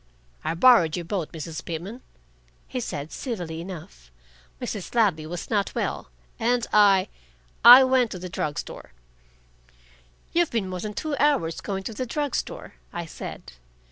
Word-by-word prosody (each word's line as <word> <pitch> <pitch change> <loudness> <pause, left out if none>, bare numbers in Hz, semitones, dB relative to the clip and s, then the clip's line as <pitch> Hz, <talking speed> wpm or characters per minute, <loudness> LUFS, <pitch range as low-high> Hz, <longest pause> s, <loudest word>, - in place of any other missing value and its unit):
"I - - -1
borrowed 175 -6 +6
your 175 - -5
boat, 175 -3 -3
Mrs. 160 0 -6
Pitman," 180 +9 -6 0.7
he 255 - -4
said, 150 -10 -5
civilly 175 - -5
enough. 155 - -10 0.5
"Mrs. 205 +2 -5
Ladley 185 -10 +2
was 175 +6 -6
not 205 -2 0
well, - - -3 0.3
and 240 +1 +1
I 200 -3 +5 0.6
I 245 +3 +11
went 260 -2 +3
to 185 - -6
the 180 +1 -6
drug 150 -4 -3
store." - - -7 1.4
"You've 345 -1 +3
been 225 -5 -1
more 185 -1 -4
than 210 +2 -5
two 310 +3 -2
hours 215 - +2
going 195 -1 -4
to 225 - -5
the 255 +4 -4
drug 290 +2 -2
store," - - -4 0.2
I 170 0 -5
said. 160 - -8
195 Hz, 155 wpm, -25 LUFS, 165-245 Hz, 1.4 s, I